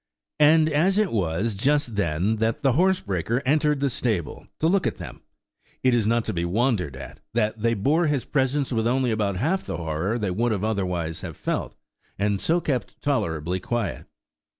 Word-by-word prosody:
And 155 Hz, +1 st, +6 dB
as 165 Hz, +6 st, +2 dB
it 210 Hz, -4 st, +2 dB
was 100 Hz, +2 st, 0 dB
just 135 Hz, +3 st, +1 dB
then 95 Hz, +3 st, 0 dB
that 110 Hz, +1 st, -1 dB
the 135 Hz, -, +4 dB
horsebreaker 125 Hz, -, +1 dB
entered 150 Hz, 0 st, +2 dB
the 140 Hz, -, +2 dB
stable 105 Hz, -, -2 dB
to -, -, 0 dB
look 185 Hz, +3 st, +3 dB
at -, -, -3 dB
them, -, -, -9 dB, 0.6 s
it 130 Hz, -1 st, +4 dB
is 115 Hz, -3 st, +2 dB
not 115 Hz, 0 st, +1 dB
to -, -, -2 dB
be 85 Hz, -1 st, -1 dB
wondered 90 Hz, -, 0 dB
at 65 Hz, -1 st, -10 dB, 0.2 s
that 110 Hz, -1 st, 0 dB
they 115 Hz, +1 st, +2 dB
bore 150 Hz, -, +2 dB
his 145 Hz, -4 st, 0 dB
presence 135 Hz, -1 st, 0 dB
with 115 Hz, 0 st, +1 dB
only 125 Hz, 0 st, +1 dB
about 105 Hz, -3 st, 0 dB
half 165 Hz, -, 0 dB
the -, -, -3 dB
horror 85 Hz, +6 st, -2 dB
they 105 Hz, -5 st, -1 dB
would 115 Hz, +5 st, +1 dB
otherwise 90 Hz, -7 st, -2 dB
have -, -, -7 dB
felt, -, -, -3 dB, 0.4 s
and 100 Hz, 0 st, 0 dB
so 170 Hz, +2 st, +2 dB
kept 135 Hz, -7 st, -3 dB
tolerably 90 Hz, -, -1 dB
quiet. 115 Hz, +3 st, -3 dB
115 Hz, 180 wpm, -24 LUFS, 95-145 Hz, 0.6 s, And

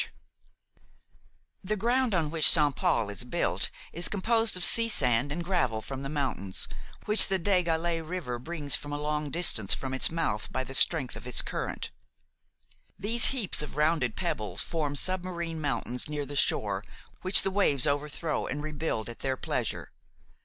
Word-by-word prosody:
Barrie -, -, -5 dB
& -, -, -39 dB
Son -, -, -33 dB, 0.8 s
The 215 Hz, +3 st, -2 dB
ground 240 Hz, +2 st, 0 dB
on 160 Hz, -3 st, -1 dB
which 160 Hz, -1 st, +5 dB
Saint 145 Hz, -4 st, +5 dB
Paul 105 Hz, -3 st, 0 dB
is 100 Hz, -, -4 dB
built 125 Hz, -, -1 dB, 0.2 s
is 170 Hz, +1 st, +2 dB
composed 225 Hz, +1 st, +2 dB
of 180 Hz, -, +6 dB
sea 230 Hz, 0 st, +5 dB
sand 130 Hz, -, +1 dB
and 170 Hz, +3 st, -4 dB
gravel 165 Hz, -, -1 dB
from 135 Hz, +4 st, -7 dB
the 135 Hz, -, -6 dB
mountains, 130 Hz, -, -1 dB, 0.4 s
which 210 Hz, +1 st, +9 dB
the 195 Hz, -, 0 dB
Des 185 Hz, +1 st, +1 dB
Galets 165 Hz, 0 st, -2 dB
river 155 Hz, -8 st, -5 dB
brings 150 Hz, +1 st, -2 dB
from 145 Hz, -, -5 dB
a 145 Hz, -, -3 dB
long 150 Hz, 0 st, -3 dB
distance 140 Hz, -, +2 dB
from 130 Hz, -1 st, -6 dB
its 130 Hz, -, +2 dB
mouth 160 Hz, -11 st, -3 dB
by 130 Hz, -, -2 dB
the 135 Hz, -, -8 dB
strength 135 Hz, -2 st, +3 dB
of -, -, -9 dB
its 125 Hz, -, +2 dB
current. -, -, -5 dB, 1.1 s
These 225 Hz, +4 st, +1 dB
heaps 235 Hz, -, +2 dB
of 150 Hz, -, -8 dB
rounded 150 Hz, -6 st, 0 dB
pebbles 105 Hz, -1 st, -3 dB
form 150 Hz, -4 st, -3 dB
submarine 170 Hz, -1 st, -1 dB
mountains 125 Hz, -1 st, -2 dB
near 150 Hz, -1 st, -4 dB
the 145 Hz, +1 st, -8 dB
shore 100 Hz, -7 st, 0 dB, 0.4 s
which 185 Hz, +1 st, +6 dB
the 195 Hz, -, -1 dB
waves 165 Hz, -10 st, +2 dB
overthrow 150 Hz, +2 st, -2 dB
and 145 Hz, +2 st, -5 dB
rebuild 155 Hz, -7 st, -4 dB
at 120 Hz, -, -9 dB
their 130 Hz, -1 st, -2 dB
pleasure. -, -, -4 dB
150 Hz, 175 wpm, -27 LUFS, 130-180 Hz, 1.1 s, which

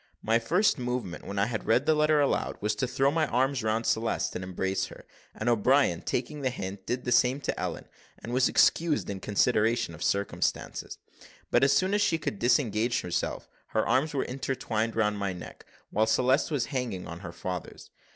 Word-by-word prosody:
My 115 Hz, +1 st, +3 dB
first 175 Hz, -, +2 dB
movement, 125 Hz, -7 st, -4 dB
when 100 Hz, -, -5 dB
I 100 Hz, -, +3 dB
had 115 Hz, -1 st, -4 dB
read 125 Hz, +5 st, +3 dB
the 155 Hz, -, +4 dB
letter 150 Hz, 0 st, +3 dB
aloud, 145 Hz, -, 0 dB
was 105 Hz, +1 st, 0 dB
to 130 Hz, -, 0 dB
throw 135 Hz, +2 st, +2 dB
my 155 Hz, 0 st, +1 dB
arms 130 Hz, +2 st, +1 dB
round 110 Hz, +1 st, 0 dB
Celeste 115 Hz, +1 st, 0 dB
and 95 Hz, -, -4 dB
embrace 95 Hz, +1 st, -2 dB
her -, -, -13 dB, 0.3 s
and 110 Hz, -, -4 dB
O'Brien, 120 Hz, -4 st, +3 dB
taking 140 Hz, +4 st, -3 dB
the 130 Hz, -, +1 dB
hint, 95 Hz, -5 st, -6 dB
did 125 Hz, +1 st, -2 dB
the 125 Hz, -, -1 dB
same 125 Hz, +3 st, +4 dB
to -, -, -3 dB
Ellen, -, -, -4 dB, 0.3 s
and 120 Hz, -, -7 dB
was 130 Hz, 0 st, +3 dB
excused 160 Hz, -9 st, +2 dB
in 95 Hz, -, -5 dB
consideration 115 Hz, +1 st, +1 dB
of 85 Hz, -, -12 dB
circumstances; 100 Hz, 0 st, -1 dB, 0.5 s
but, -, -, +4 dB
as 140 Hz, 0 st, +5 dB
soon 185 Hz, +7 st, +2 dB
as 205 Hz, -, +2 dB
she 165 Hz, -5 st, +2 dB
could 110 Hz, -10 st, -4 dB
disengage 120 Hz, -2 st, +2 dB
herself 90 Hz, -, -3 dB, 0.3 s
her -, -, +2 dB
arms 145 Hz, +4 st, +1 dB
were 135 Hz, -, 0 dB
entwined 125 Hz, -4 st, -2 dB
round 105 Hz, -2 st, +1 dB
my 100 Hz, -2 st, -1 dB
neck, 85 Hz, -4 st, -11 dB, 0.2 s
while 110 Hz, +2 st, +2 dB
Celeste 130 Hz, +7 st, +2 dB
was 145 Hz, -6 st, 0 dB
hanging 120 Hz, -8 st, -3 dB
on 85 Hz, 0 st, -7 dB
her 85 Hz, -, -7 dB
father's. 90 Hz, 0 st, -6 dB
120 Hz, 195 wpm, -28 LUFS, 105-135 Hz, 0.5 s, as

